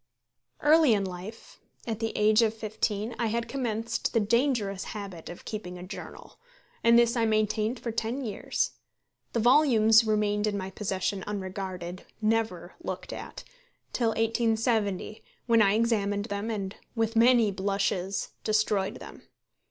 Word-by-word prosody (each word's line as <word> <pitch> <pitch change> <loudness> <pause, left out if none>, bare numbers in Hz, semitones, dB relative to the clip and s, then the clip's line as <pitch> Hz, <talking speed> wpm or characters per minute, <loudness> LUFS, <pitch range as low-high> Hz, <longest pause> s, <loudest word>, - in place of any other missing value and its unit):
Early 300 -5 +6
in 200 -1 0
life, 185 +5 -9 0.3
at 225 -2 -3
the 225 -1 -1
age 215 +2 +5
of 225 -1 +2
fifteen, 215 0 -2
I 235 - +1
had 230 +1 -1
commenced 230 -3 -2
the 230 - +4
dangerous 220 -3 +1
habit 195 -5 -8
of 175 - -10
keeping 180 -5 -6
a 180 - -8
journal, 185 - -10 0.4
and 235 0 +6
this 235 0 +4
I 230 -1 +2
maintained 215 +2 +1
for 235 - -4
ten 230 +4 -2
years. 210 -5 -2 0.6
The 235 - +1
volumes 230 -3 +5
remained 210 -1 +1
in 205 -1 -1
my 190 -1 -5
possession 195 -1 -2
unregarded 185 -3 -5
never 215 -5 -1
looked - - -5
at - - -8 0.5
till 235 -2 +1
1870, 225 -2 0 0.2
when 230 -2 +4
I 200 -1 +4
examined 205 -3 +1
them, 205 0 -3
and, 200 -3 -3 0.2
with 225 0 0
many 230 -2 +5
blushes, 195 -1 -1
destroyed 215 -2 +1
them. - - -11
215 Hz, 145 wpm, -28 LUFS, 200-230 Hz, 0.6 s, Early